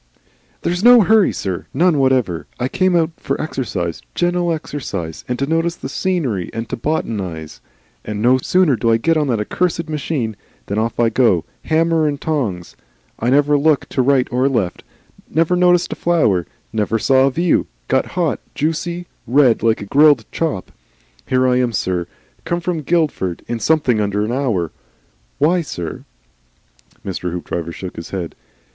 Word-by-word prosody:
"There's 175 +3 -1
no 245 0 +8
hurry, 215 0 +4
sir, 95 -3 -4
none 170 -3 +3
whatever. 130 -11 +1
I 125 - 0
came 185 +5 +1
out 165 -1 +2
for - - -3
exercise, 105 - -3
gentle 175 0 +1
exercise, 110 - -5
and 125 - -2
to 140 - 0
notice 165 +3 0
the 135 - -7
scenery 140 - -1
and 115 0 -3
to - - -2
botanise. 95 - -3 0.4
And 105 -1 -4
no 125 +4 +4
sooner 180 0 +3
do 115 +1 0
I 115 - +4
get 165 +8 +1
on 150 -2 +1
the 120 -4 +1
accursed 165 +9 -1
machine, 140 -7 -2 0.3
than 100 +2 -2
off 115 +1 -2
I 115 -1 +4
go 110 -8 +2 0.2
hammer 165 0 +2
and 145 -1 -2
tongs; 110 - -2 0.4
I 120 - 0
never 145 +2 +4
look 150 0 +2
to - - 0
right 130 0 +3
or 130 +2 +2
left, 100 -9 -1 0.5
never 165 +2 +2
notice 180 -1 +4
a - - -2
flower, 110 - +1 0.3
never 110 0 0
see 135 - +1
a 130 +1 +5
view, 170 +5 +1 0.2
get - - +1
hot, - - +1 0.2
juicy, 170 +3 -2 0.2
red, 125 -1 +4
like 115 -1 +2
a - - -7
grilled 145 +6 +4
chop. 105 - -2 0.6
Here 130 0 +2
I 125 0 +3
am, 125 -2 +1
sir. 90 -3 -1 0.4
Come 170 +1 -1
from 170 -2 -2
Guildford 150 - 0
in 120 -1 -3
something 130 -7 +2
under 105 0 0
the 115 - -2
hour. 115 - 0 0.7
WHY, 170 +5 +3
sir?" 90 - -6 1.0
Mr. 90 -2 -3
Hoopdriver 85 -1 -4
shook 90 +2 -8
his 85 - -7
head. 90 -4 -4
130 Hz, 165 wpm, -19 LUFS, 105-165 Hz, 1.0 s, no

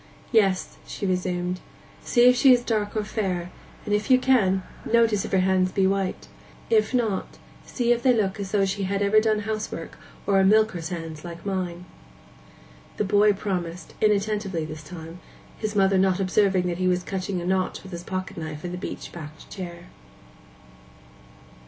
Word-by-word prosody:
'Yes,' 195 -5 +2
she - - -5
resumed, 180 -1 -1 0.4
'see 240 0 +4
if 250 - +7
she 265 +1 +6
is 245 -1 +5
dark 215 -2 -1
or 215 - 0
fair, 185 -5 -2 0.3
and 210 - -1
if 210 +5 0
you 255 - +7
can, 210 -8 +3 0.2
notice 225 -3 +2
if - - -7
her 190 - +3
hands 185 0 +2
be 190 - +2
white; 195 -1 -1 0.4
if 440 -1 +3
not, 225 -6 -1 0.3
see 240 -2 0
if 240 0 +2
they 255 - +4
look 210 -4 0
as 195 -1 -4
though 200 -1 +2
she 195 0 -2
had 200 +1 0
ever 205 +2 +5
done 215 -1 +1
housework, 215 0 -5 0.3
or 195 -1 +3
are - - +4
milker's 195 -5 +3
hands 165 -3 -6
like 170 +1 -9
mine.' 180 -3 -3 1.1
The - - +1
boy 205 +1 +4
again 200 - +2
promised, 180 -4 -4
inattentively 205 -5 +1
this 155 0 -7
time, 165 +2 -9 0.4
his 215 -1 -3
mother 195 -1 +4
not 190 0 +2
observing 190 -1 +2
that 175 0 -2
he 185 - +1
was 180 0 +1
cutting 190 -1 -3
a 175 - -5
notch 185 0 -1
with 190 - -11
his 170 -1 -5
pocket 185 +1 -5
knife 155 0 -6
in 175 - -4
the 180 - -5
beech - - -6
backed 155 -2 -10
chair. 175 -3 -7
195 Hz, 180 wpm, -25 LUFS, 180-210 Hz, 1.1 s, if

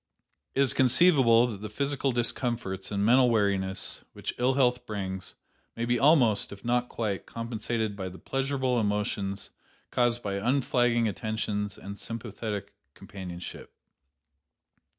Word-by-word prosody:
"It 135 - +3
is 135 - +4
conceivable 130 -3 +5
that 110 -5 -5
the 110 - -5
physical 140 +4 0
discomforts 120 -5 -1
and 100 -1 0
mental 125 +2 +5
weariness 100 -4 0
which - - -5
ill 125 +2 +2
health 125 -2 +2
brings 95 -3 -5 0.4
may 115 - -2
be 120 0 +1
almost, 130 -8 +4
if 100 +3 -11
not 125 +1 +1
quite, 105 -4 -3
compensated 115 -2 -3
by 95 -2 -4
the 95 - -11
pleasurable 135 -1 -1
emotions 105 -2 -2 0.4
caused 120 -1 +1
by 100 -1 -2
unflagging 120 0 +2
attentions 105 -1 -3
and 100 +1 -8
sympathetic 105 -3 -5 0.2
companionship. 90 -3 -9
115 Hz, 130 wpm, -28 LUFS, 100-125 Hz, 0.4 s, conceivable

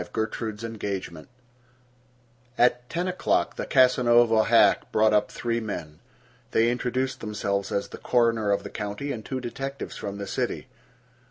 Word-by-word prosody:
GERTRUDE'S 110 -1 -3
ENGAGEMENT 100 -7 -5 1.3
At 125 0 +2
ten 175 +2 -2
o'clock 180 0 0
the - - -4
Casanova 120 -3 +4
hack 115 0 +4
brought 110 0 +3
up 105 0 +2
three 115 0 -2
men. 85 -9 -6 0.5
They 115 +1 +4
introduced 125 +2 -2
themselves 100 -2 -2
as 100 - -1
the - - -9
coroner 115 -3 +2
of 100 - +1
the - - -8
county 105 +7 -4
and 110 -4 -5
two 130 +3 -4
detectives 135 +2 -5
from 100 -1 -5
the 100 - -5
city. - - -3
115 Hz, 145 wpm, -26 LUFS, 105-125 Hz, 1.3 s, Casanova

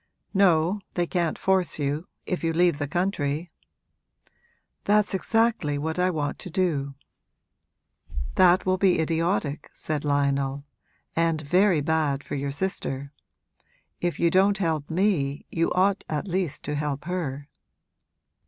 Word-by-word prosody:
'No, 190 0 +3
they 175 - +1
can't 170 -2 -1
force 190 -2 +1
you, 150 +3 -2 0.2
if 180 - -3
you 165 0 +1
leave 170 -2 +3
the 145 - -1
country.' 160 -1 -1 1.3
'That's 210 0 +3
exactly 215 -7 +1
what 160 +4 -3
I 180 +1 +3
want 150 -5 -2
to - - -6
do.' 155 -7 -1 1.4
'That 185 0 +5
will 185 0 +1
be 190 -4 +4
idiotic,' 160 -2 -1
said 150 -2 -3
Lionel, 140 -1 0 0.5
'and 165 -1 +2
very 180 +2 +3
bad 145 -2 0
for - - -8
your 140 0 -2
sister. 140 -4 -3 0.9
If 175 -1 -2
you 170 -1 +3
don't 195 +2 +4
help 160 -6 -1
me 160 -6 0
you 165 0 0
ought 195 +2 +2
at 155 +5 -2
least 180 -4 -2
to 150 - -3
help 145 -1 -2
her.' 145 -6 -3
165 Hz, 135 wpm, -26 LUFS, 145-185 Hz, 1.4 s, That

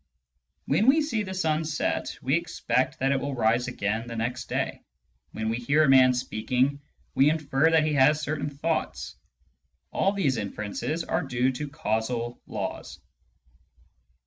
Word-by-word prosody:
When 180 - +2
we 305 +4 +5
see 235 -8 -1
the 190 -2 -5
sun 160 -3 +1
set, 155 -1 -2
we - - 0
expect - - 0
that 135 +1 +1
it 135 - +2
will 140 0 -3
rise 115 +1 +2
again 110 -1 -2
the 115 - -6
next 120 +3 -3
day. - - -2 0.5
When 110 - -4
we 115 +1 0
hear 140 +6 +2
a 145 - +3
man 130 -1 +6
speaking, 125 +4 0 0.3
we 135 +2 +5
infer 150 -1 +2
that 160 -1 +4
he 155 - 0
has 145 +2 +4
certain 150 -1 -2
thoughts. 150 +3 -3 0.8
All 195 - +2
these 160 -11 0
inferences 110 +9 -3
are - - -1
due 130 -1 0
to 145 +3 -5
causal 120 -2 -2
laws. - - -5
135 Hz, 155 wpm, -26 LUFS, 120-155 Hz, 0.8 s, man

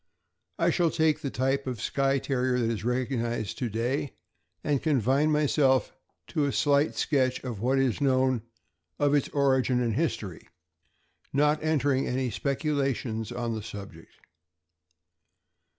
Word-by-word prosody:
I - - +2
shall 175 -2 +2
take 160 -1 +1
the 140 - -2
type 135 +2 -1
of 125 -4 -3
Skye 135 +4 +1
Terrier 130 -1 0
that 115 -2 +1
is 110 - -4
recognized 120 -3 -2
to 125 - -1
day, 125 +6 -2 0.5
and 145 -3 0
confine 140 +1 +2
myself 145 -3 +2 0.4
to 155 -4 0
a 140 - 0
slight 145 +1 +2
sketch 130 -4 +1
of 120 -6 -5
what 130 +3 +2
is 135 -1 +1
known 130 -3 +2 0.6
of 145 0 +2
its 145 -2 +2
origin 130 -3 +2
and 120 -2 0
history, 110 - -3 0.8
not 150 +2 +2
entering 145 -4 +1
into - - -2
any 130 -2 -1
speculations 135 - -1
on 120 -1 -3
the 110 - -4
subject. 100 -6 -10
130 Hz, 140 wpm, -27 LUFS, 120-145 Hz, 0.8 s, I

